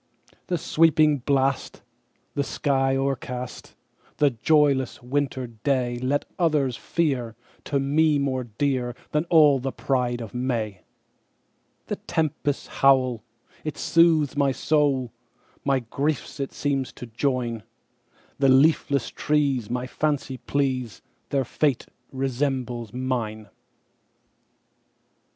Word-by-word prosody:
"The 175 Hz, -, 0 dB
sweeping 155 Hz, -2 st, +3 dB
blast, 135 Hz, +1 st, 0 dB, 0.5 s
the 140 Hz, -, 0 dB
sky 135 Hz, -1 st, +1 dB
o'ercast,"The 135 Hz, +1 st, -3 dB
joyless 135 Hz, 0 st, +2 dB
winter 135 Hz, 0 st, -1 dB, 0.2 s
dayLet 130 Hz, 0 st, 0 dB, 0.2 s
others 150 Hz, -7 st, +2 dB
fear, 130 Hz, -10 st, -1 dB, 0.3 s
to 140 Hz, -, 0 dB
me 150 Hz, +2 st, +3 dB
more 130 Hz, -3 st, -1 dB
dearThan 130 Hz, +5 st, -2 dB
all 150 Hz, -5 st, +6 dB
the 135 Hz, +1 st, -3 dB
pride 125 Hz, -3 st, -1 dB
of 115 Hz, -4 st, -7 dB
May:The 115 Hz, -6 st, -7 dB
tempest's 150 Hz, -2 st, -2 dB, 0.2 s
howl, 130 Hz, -4 st, +4 dB, 0.4 s
it 155 Hz, -1 st, -4 dB
soothes 165 Hz, -4 st, +3 dB
my 140 Hz, -1 st, +2 dB
soul, 135 Hz, -3 st, +1 dB, 0.5 s
My 135 Hz, -2 st, +1 dB
griefs 140 Hz, +6 st, -3 dB
it 135 Hz, -, -3 dB
seems 140 Hz, -3 st, -1 dB
to -, -, -8 dB
join; 120 Hz, -1 st, -1 dB, 0.8 s
The 135 Hz, -1 st, +4 dB
leafless 140 Hz, 0 st, +3 dB
trees 140 Hz, -7 st, 0 dB
my 125 Hz, +1 st, -2 dB
fancy 140 Hz, 0 st, -2 dB
please, 130 Hz, -6 st, -2 dB, 0.3 s
Their 135 Hz, -2 st, 0 dB
fate 140 Hz, 0 st, 0 dB, 0.3 s
resembles 130 Hz, -3 st, -2 dB
mine! 115 Hz, -4 st, -3 dB
135 Hz, 100 wpm, -25 LUFS, 125-145 Hz, 0.8 s, all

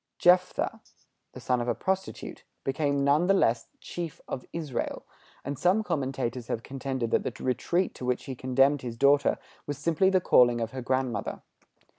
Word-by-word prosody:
Jephtha, 180 Hz, +1 st, +3 dB, 0.5 s
the -, -, -9 dB
son 125 Hz, -1 st, 0 dB
of 120 Hz, -, -3 dB
a 120 Hz, -, +1 dB
prostitute, 190 Hz, 0 st, -3 dB, 0.2 s
became 140 Hz, 0 st, 0 dB
none 145 Hz, +5 st, +3 dB
the 195 Hz, -, +5 dB
less 115 Hz, -10 st, +2 dB
chief 170 Hz, -3 st, -6 dB
of 125 Hz, -, -5 dB
Israel; 155 Hz, -7 st, -4 dB, 0.4 s
and 140 Hz, 0 st, -4 dB
some 195 Hz, +5 st, +3 dB
commentators 130 Hz, -, -2 dB
have 115 Hz, -, -3 dB
contended 130 Hz, -3 st, -3 dB
that -, -, +3 dB
the -, -, -5 dB
retreat 170 Hz, +9 st, 0 dB
to -, -, -10 dB
which 125 Hz, 0 st, 0 dB
he 135 Hz, -, -4 dB
condemned 135 Hz, +3 st, +2 dB
his 120 Hz, -2 st, -6 dB
daughter 140 Hz, +2 st, +4 dB, 0.3 s
was 145 Hz, -1 st, -3 dB
simply 170 Hz, +5 st, +2 dB
the 190 Hz, -1 st, +4 dB
calling 120 Hz, -8 st, +5 dB
of 115 Hz, -1 st, -2 dB
her 130 Hz, -, -5 dB
grandmother. 130 Hz, -2 st, -2 dB
135 Hz, 170 wpm, -28 LUFS, 125-165 Hz, 0.5 s, the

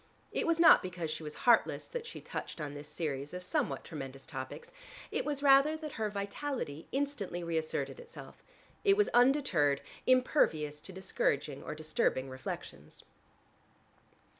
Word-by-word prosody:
It -, -, -1 dB
was 335 Hz, 0 st, +2 dB
not 335 Hz, -, +8 dB
because 175 Hz, -3 st, -4 dB
she 155 Hz, -, -4 dB
was 150 Hz, -1 st, -7 dB
heartless 240 Hz, -2 st, +4 dB
that 475 Hz, -1 st, -6 dB
she 465 Hz, -, -8 dB
touched -, -, -6 dB
on 145 Hz, -2 st, -4 dB
this 145 Hz, +1 st, -9 dB
series 150 Hz, -1 st, -3 dB
of 180 Hz, -, -5 dB
somewhat 290 Hz, -, -1 dB
tremendous 135 Hz, -4 st, -7 dB
topics: 130 Hz, -3 st, -7 dB, 0.4 s
it -, -, -1 dB
was 290 Hz, -1 st, -2 dB
rather 280 Hz, +3 st, +6 dB
that 310 Hz, -1 st, -6 dB
her 220 Hz, -3 st, -2 dB
vitality 200 Hz, -, -4 dB
instantly 260 Hz, -11 st, -2 dB
reasserted 160 Hz, -, -2 dB
itself: 480 Hz, 0 st, -12 dB, 0.4 s
it 400 Hz, -1 st, +5 dB
was 415 Hz, -, +4 dB
undeterred, 240 Hz, -, +4 dB, 0.3 s
impervious 160 Hz, -, +3 dB
to -, -, -8 dB
discouraging 150 Hz, -7 st, -1 dB
or 150 Hz, -, -5 dB
disturbing 155 Hz, -4 st, 0 dB
reflections. 130 Hz, 0 st, -7 dB
180 Hz, 145 wpm, -32 LUFS, -, 0.4 s, not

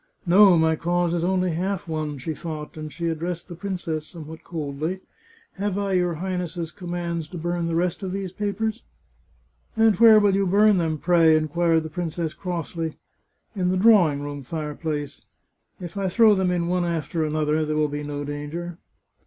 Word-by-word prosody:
" -, -, -39 dB
No, 185 Hz, 0 st, +7 dB
my 160 Hz, 0 st, +3 dB
cause 175 Hz, +1 st, 0 dB
is 170 Hz, -1 st, 0 dB
only 185 Hz, 0 st, +1 dB
half 185 Hz, +3 st, -2 dB
won," 155 Hz, -2 st, -3 dB
she 145 Hz, +5 st, -4 dB
thought, 155 Hz, -1 st, -7 dB
and 155 Hz, -1 st, -7 dB
she 170 Hz, +1 st, -3 dB
addressed 165 Hz, +1 st, -3 dB
the 175 Hz, -, -8 dB
princess, 170 Hz, -4 st, -4 dB
somewhat 160 Hz, -1 st, -10 dB
coldly, 160 Hz, +3 st, -4 dB, 0.3 s
" 455 Hz, 0 st, -30 dB
Have 200 Hz, -1 st, -1 dB
I 200 Hz, -1 st, -1 dB
your 180 Hz, -2 st, +1 dB
Highness's 175 Hz, -1 st, -3 dB
com 180 Hz, -3 st, -9 dB
mands 170 Hz, -2 st, -3 dB
to 175 Hz, -, -8 dB
burn 175 Hz, +1 st, -2 dB
the 165 Hz, -, -1 dB
rest 175 Hz, +2 st, 0 dB
of 190 Hz, -2 st, -4 dB
these 195 Hz, -1 st, -4 dB
papers? 210 Hz, +3 st, -2 dB, 0.3 s
" -, -, -37 dB
" -, -, -36 dB
And 220 Hz, -3 st, +4 dB
where 225 Hz, -2 st, +8 dB
will 205 Hz, -2 st, +3 dB
you 195 Hz, -1 st, +1 dB
bum 205 Hz, +1 st, +4 dB
them, 160 Hz, -2 st, 0 dB
pray? 165 Hz, -1 st, +4 dB
" -, -, +5 dB
inquired 160 Hz, +1 st, +1 dB
the 160 Hz, -, -6 dB
princess 165 Hz, -1 st, -3 dB
crossly. 165 Hz, -3 st, -4 dB, 0.3 s
" -, -, -44 dB
In 180 Hz, -2 st, 0 dB
the 185 Hz, -, +1 dB
drawing 185 Hz, -9 st, +5 dB
room 145 Hz, 0 st, -5 dB
fireplace. 150 Hz, 0 st, -4 dB, 0.6 s
If 175 Hz, 0 st, -8 dB
I 195 Hz, -1 st, -1 dB
throw 215 Hz, +3 st, +5 dB
them 190 Hz, -2 st, +1 dB
in 175 Hz, -1 st, 0 dB
one 180 Hz, 0 st, +1 dB
after 165 Hz, -1 st, -1 dB
the 155 Hz, -, -2 dB
other 155 Hz, 0 st, +1 dB
there 155 Hz, 0 st, -2 dB
will 155 Hz, 0 st, +2 dB
be 145 Hz, 0 st, -4 dB
no 145 Hz, 0 st, -4 dB
danger." 150 Hz, +4 st, -5 dB
170 Hz, 200 wpm, -24 LUFS, 155-185 Hz, 0.6 s, where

